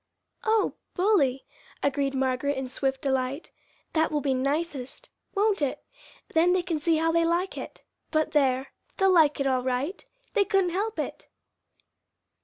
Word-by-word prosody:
"O 440 -1 +2 0.2
bully!" 355 -10 +2 0.4
agreed 275 -1 0
Margaret 265 +1 0
in 265 -1 -3
swift 265 0 -2
delight. 265 +2 -1 0.4
"That 320 0 +2
will 300 - +1
be 275 -1 0
nicest; 275 0 -2 0.3
won't 405 -2 +2
it? 280 -3 -2 0.5
Then 340 +3 +4
they 365 -1 +1
can 335 -4 -2
see 325 +1 +2
how 325 +1 +2
they 335 0 +3
like 345 +3 0
it - - -8 0.3
but 310 -1 +1
there! 265 -3 +2 0.3
they'll 385 -1 +4
like 310 -5 +5
it 275 - 0
all 260 -1 +2
right. 260 +8 -2 0.3
They 420 - +4
couldn't 385 -2 +1
help 415 +5 -2
it." - - -4
300 Hz, 155 wpm, -27 LUFS, 265-355 Hz, 0.5 s, like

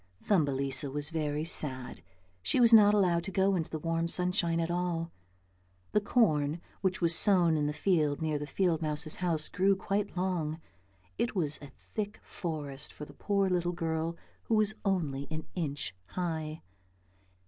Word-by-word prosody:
Thumbelisa 140 -6 +2
was 145 +3 -3
very 155 -1 -2
sad. 130 - -1 0.4
She 170 - +1
was 235 -1 +5
not 210 -2 +8
allowed 175 -4 +2
to 195 - -5
go 195 +1 +2
out - - +1
into 160 - -3
the 160 - -4
warm 165 +1 -1
sunshine 175 -1 +1
at 165 0 -1
all; 175 -1 -2 0.8
the 210 - +2
corn 160 -9 +2 0.2
which 190 +1 -1
was 170 -1 +3
sown 180 -5 +5
in 150 -1 0
the - - 0
field 150 -3 +1
near 155 -2 -1
the 145 - -5
field 170 +1 0
mouse's 155 0 +1
house 165 -4 0
grew 195 +2 +2
quite 195 0 -2
long, 170 -4 -1 0.6
it 235 - -1
was 155 -5 +3
a 145 - -10 0.2
thick 210 -1 -3
forest 150 -6 -6
for 150 - -9
the - - -14
poor 200 -1 0
little 175 -1 0
girl 165 0 -2 0.3
who 225 - +1
Was 215 0 +3
only 155 -9 -1
an 155 0 -5
inch 145 - -3
high. 160 - -4
165 Hz, 170 wpm, -30 LUFS, 150-185 Hz, 0.8 s, not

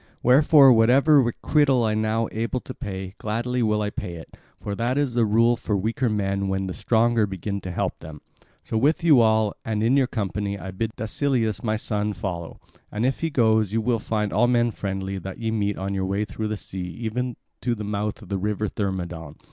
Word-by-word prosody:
Wherefore 135 +1 +7
whatever 135 +6 +5
requital 130 +2 +2
I 110 - +1
am 110 0 0
now 110 +1 0
able 115 +3 -2
to 130 - -8
pay, 95 -7 -6
gladly 120 +4 -2
will 105 -2 +1
I 105 - -2
pay 90 -4 -5
it, 80 - -11 0.2
for 100 - -5
that 120 +5 -1
is 145 -4 0
the 115 -2 +2
rule 115 +3 +4
for 105 -2 -2
weaker 115 +5 0
men 100 -2 -1
when 95 0 -1
the 95 - -4
stronger 115 +1 +2
begin 100 +1 -4
to 95 - -6
help - - -2
them. 80 -1 -10 0.4
So 110 - -2
with 150 +7 +2
you 150 -7 +6
all, 110 -2 +3
and 110 -1 -1
in 120 +4 +3
your 135 -2 +3
company, 100 -2 -3
I 95 0 -7
bid 110 +4 -3
Dascylus 110 -3 -1
my 110 -2 0
son 105 -1 -2
follow; 90 -3 -5 0.3
and 105 +3 -1
if 130 - 0
he 165 - -1
goes, 110 -6 +2
you 115 - +2
will 120 0 +1
find 105 -1 -2
all 120 +4 +3
men 120 -1 +2
friendly 95 -1 -4
that 95 +1 -7
ye 115 -1 -2
meet 105 -2 -1
on 95 +1 -3
your 95 -1 -1
way 100 +2 -1
through 110 +2 -4
the 105 0 -3
sea 95 -1 -7 0.2
even 120 +2 -2 0.3
to 120 -1 0
the 105 - -6
mouth 105 0 -3
of - - -14
the 100 -1 -1
river 105 +2 -1
Thermodon. 90 -6 -4
110 Hz, 215 wpm, -24 LUFS, 100-120 Hz, 0.4 s, Wherefore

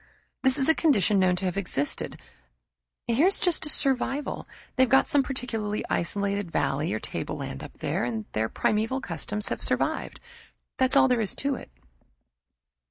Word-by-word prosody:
This 265 0 +5
is 270 - +2
a 320 - +6
condition 215 - +3
known 185 -1 +3
to 185 +2 -3
have 180 0 -2
existed 145 -7 -2 0.9
here's 290 +12 +3
just 340 -3 +1
a - - +3
survival. 275 0 +1 0.3
They've 260 -1 +3
got 265 +3 +5
some 285 - +3
peculiarly 225 -6 -3
isolated 200 +1 -1
valley 150 -1 0
or 110 - -1
tableland 65 - -5
up - - -9
there, - - -2
and 115 -3 -3
their 110 +1 -1
primeval 220 +5 0
customs 205 - -2
have - - -3
survived. - - -1 0.6
That's 260 +1 +3
all 275 -1 +6
there 250 -3 +2
is 210 - -1
to 280 +1 -1
it." 255 - -8
225 Hz, 160 wpm, -26 LUFS, 185-270 Hz, 0.9 s, a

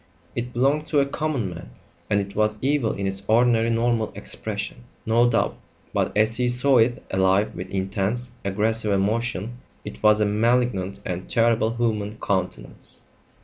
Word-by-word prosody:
It 120 +1 -3
belonged 140 +5 +1
to 150 - +2
a 140 - +4
common 140 -8 -2
man, 85 -7 -9 0.4
and 105 - +3
it 100 0 -5
was 105 0 +1
evil 135 -3 +1
in 100 - -3
its 95 0 -2
ordinary 115 0 +4
normal 115 -1 +1
expression, 105 +2 -4 0.2
no 120 +2 +4
doubt, 115 - 0 0.3
but - - +1
as 110 +1 +2
he 125 0 +1
saw 125 +1 +4
it, 120 +2 +2
alive 95 +2 +2
with 90 - -7
intense, 100 +6 -2
aggressive 105 +2 0
emotion, 115 +3 -1 0.3
it 65 - -8
was 105 0 +5
a 105 - +3
malignant 105 -3 +1
and 90 0 -4
terrible 115 0 +2
human 110 -3 -1
countenance. 90 -11 -3
110 Hz, 155 wpm, -24 LUFS, 100-120 Hz, 0.4 s, was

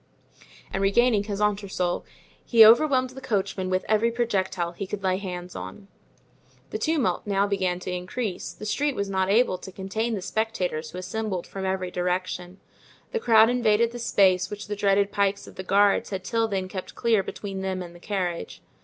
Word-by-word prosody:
And 195 - -1
regaining 205 +1 +3
his 205 -2 -4
entresol 200 -4 0 0.4
he 230 -2 +7
overwhelmed 255 +2 +5
the 265 +1 -10
coachman 200 -5 -1
with 185 0 0
every 220 +2 +3
projectile 190 -7 -1
he 190 +3 -6
could 200 0 -5
lay 185 -1 +2
hands 180 -2 -6
on. 95 - -8 0.8
The - - -3
tumult 275 - 0
now 200 0 +2
began 190 -3 -1
to 185 - -4
increase; 185 +3 -4
the - - -10
street 280 +6 0
was 200 0 -2
not 190 0 +1
able 205 -3 +3
to 190 - -9
contain 220 +5 -2
the 190 - -5
spectators 180 -9 -2
who 180 - -9
assembled 190 0 -3
from 195 -1 -6
every 190 -1 -2
direction; 180 0 -2 0.5
the 465 - -1
crowd 225 - +6
invaded 230 -2 +2
the 240 - -7
space 190 -5 +3
which 205 0 -6
the 210 - -4
dreaded 200 0 +2
pikes 200 -1 0
of - - -12
the - - -6
guards 200 +2 +3
had 190 -2 -4
till 225 +3 0
then 190 -3 -2
kept 185 0 -7
clear 225 -3 +2
between 195 0 -6
them 190 -1 -2
and 175 -1 -10
the 175 - -14
carriage. 180 - -3
195 Hz, 185 wpm, -25 LUFS, 185-220 Hz, 0.8 s, he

